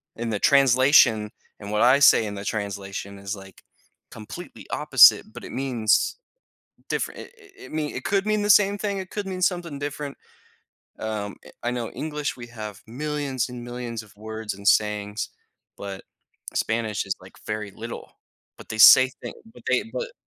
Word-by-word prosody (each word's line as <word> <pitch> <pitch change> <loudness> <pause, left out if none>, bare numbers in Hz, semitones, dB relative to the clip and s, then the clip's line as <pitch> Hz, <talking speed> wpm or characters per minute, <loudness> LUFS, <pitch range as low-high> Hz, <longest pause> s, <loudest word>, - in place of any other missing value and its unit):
in 115 0 -4
the 105 - -1
translation, 130 -5 +5 0.3
and 100 0 -7
what 105 - +1
I 125 +3 +6
say 130 -5 +6
in 100 - -6
the 100 0 -7
translation 100 -1 -4
is, 100 +1 -5
like, 95 0 -14 0.5
completely 105 - -10
opposite, - - +6
but - - -10
it - - -8
means 125 - +1 0.7
different - - -2
it - - -12 0.3
it 395 - -12
mean 155 -1 -3
it 125 - -5
could 195 0 +1
mean 215 -1 +1
the 205 - -1
same 205 0 +5
thing, 200 -1 -2
it 185 - -7
could 205 -2 -4
mean 185 -1 -5
something 175 -5 -1
different. 145 0 -5 0.8
Um, 105 -2 -4 0.3
i 120 - -1
I - - +1
know 120 -2 -3
English 150 -1 -4
we 120 -1 -9
have 110 -4 -8
millions 140 +1 -3
and 125 -1 -8
millions 120 -2 -5
of 105 -1 -19
words 110 0 -6
and 100 +1 -11
sayings, 105 0 +1 0.5
but 100 -1 -7 0.5
Spanish 110 -3 -1
is, 95 - -1
like, 95 - -15
very 105 -1 -4
little. 115 +3 -8 0.5
But - - -13
they 110 - -4
say 130 +4 +9
thing - - -6 0.2
but - - -15
they, 125 - +3
but - - -4
120 Hz, 175 wpm, -24 LUFS, 105-145 Hz, 0.8 s, say